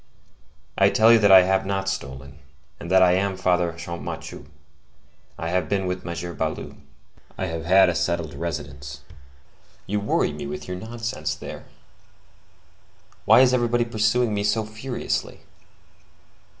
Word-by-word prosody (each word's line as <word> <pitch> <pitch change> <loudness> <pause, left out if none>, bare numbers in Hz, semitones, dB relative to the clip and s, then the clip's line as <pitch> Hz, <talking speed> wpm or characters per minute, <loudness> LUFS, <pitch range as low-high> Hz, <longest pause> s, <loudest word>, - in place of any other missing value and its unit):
I - - +6
tell 115 +1 +5
you 115 - +6
that 100 -2 +4
I 95 -1 +9
have 95 +1 +1
not 95 0 -2
stolen, 70 -6 -6 0.4
and 85 - -8
that 95 0 +5
I 90 - +5
am 95 +1 0
Father 90 -2 +1
Champmathieu; 85 -4 -7 0.9
I 80 - -4
have 90 -3 -1
been 95 -2 0
with 90 0 -3
M. 85 0 -5
Baloup; - - -4 0.6
I 95 - -2
have 80 -2 -5
had 95 +2 +6
a 90 - +1
settled 85 -2 -2
residence. 70 -4 -6 0.8
You 105 +1 -1
worry 100 -6 0
me 75 -1 -6
with 75 +1 -7
your 90 0 -4
nonsense, 110 -8 -4
there! - - -9 1.6
Why - - +7
is 130 -1 +4
everybody 120 -1 +1
pursuing 110 +1 +1
me 100 0 -1
so 110 +1 0
furiously?" 110 +4 -4
95 Hz, 145 wpm, -23 LUFS, 85-105 Hz, 1.6 s, I